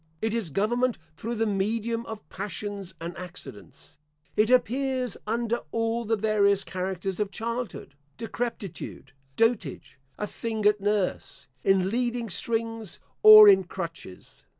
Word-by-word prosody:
It 220 +3 -1
is 225 -7 -1
government 240 - +1 0.2
through 230 +10 -4
the 225 0 +1
medium 225 +3 -1
of 220 -1 -8
passions 200 -1 -6
and 170 +1 -6
accidents. 150 - -10 0.4
It 215 +1 +3
appears 255 0 +1
under 235 +1 0
all 230 +1 -1
the 225 +1 +1
various 200 -2 +2
characters 185 0 -4
of 210 -2 0
childhood, 230 +3 -5 0.2
decrepitude, 230 -4 -5 0.2
dotage, 205 - 0 0.2
a 210 - -2
thing 220 0 -4
at 210 -1 +4
nurse, 205 -2 -1 0.2
in 190 -1 +3
leading 240 -2 -1
strings, 225 -2 -2 0.2
or 215 0 +11
in 190 -2 +6
crutches. 165 - -8
215 Hz, 125 wpm, -27 LUFS, 195-230 Hz, 0.4 s, or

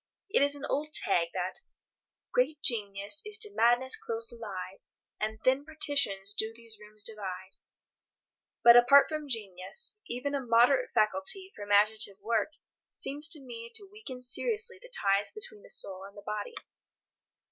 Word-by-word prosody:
It 435 - +4
is 285 0 +4
an 285 0 -7
old 305 +2 -2
tag 175 -4 +2
that 185 0 -3 0.7
"Great 470 -12 +1
Genius 205 +1 +2
is 425 0 -2
to 425 -2 0
madness 245 - +2
close 230 0 -2
allied, 195 -5 -7 0.4
And 220 +1 -2
thin 265 +2 +2
partitions 280 -11 -1
do 220 +1 0
those 230 -2 -9
rooms 210 0 -8
divide." 190 -4 -3 1.1
But, 235 0 +9
apart 245 +4 +7
from 305 -2 -5
genius, 215 - -2
even 250 +4 -4
a 280 - -1
moderate 245 - +4
faculty 215 - +2
for - - -11
imaginative 205 0 +2
work 230 +8 -1 0.4
seems 290 +2 0
to 300 -3 +2
me 235 -2 -9
to 405 - -6
weaken 275 -13 -8
seriously 460 - 0
the - - -13
ties 200 - +1
between 430 0 -4
the - - -15
soul 190 - +2
and 200 +1 -12
the 205 - -11
body. 210 - -5
235 Hz, 155 wpm, -30 LUFS, 205-300 Hz, 1.1 s, But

